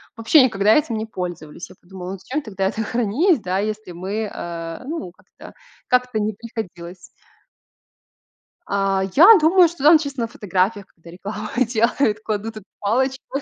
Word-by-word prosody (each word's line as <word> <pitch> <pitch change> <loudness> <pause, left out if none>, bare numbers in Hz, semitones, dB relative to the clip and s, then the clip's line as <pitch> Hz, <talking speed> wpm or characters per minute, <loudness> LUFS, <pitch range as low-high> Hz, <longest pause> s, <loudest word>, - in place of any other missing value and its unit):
вообще 230 +6 +5
никогда 215 -3 +3
этим 285 -7 +1
не 215 - -3
пользовались. 175 -6 -7
Я 185 - -15
подумала: 180 0 -9
"Ну, 195 - -6
зачем 265 +10 -4
тогда 195 -7 -4
это 220 +3 -2
хранить, 245 - +1
да, 185 +1 -1
если 215 -2 -4
мы, 200 +5 -4
а, 165 +1 -6
ну, 290 - -5
как-то, - - -16 0.3
как-то 250 -3 +1
не 215 +1 -1
приходилось". 190 -6 -8 1.7
А, 195 -1 0
я 390 +8 +9
думаю, 345 +3 +5
что 325 -4 -9
там 315 +2 +8
чисто 280 -4 -5
на 230 - -1
фотографиях, 200 -1 -1
когда 170 0 -18
рекламу 210 +4 -7 0.2
делают, 225 -1 +1
кладут 215 +1 -4
эту 210 - -11
палочку. 265 +6 -1
215 Hz, 155 wpm, -21 LUFS, 190-250 Hz, 1.7 s, я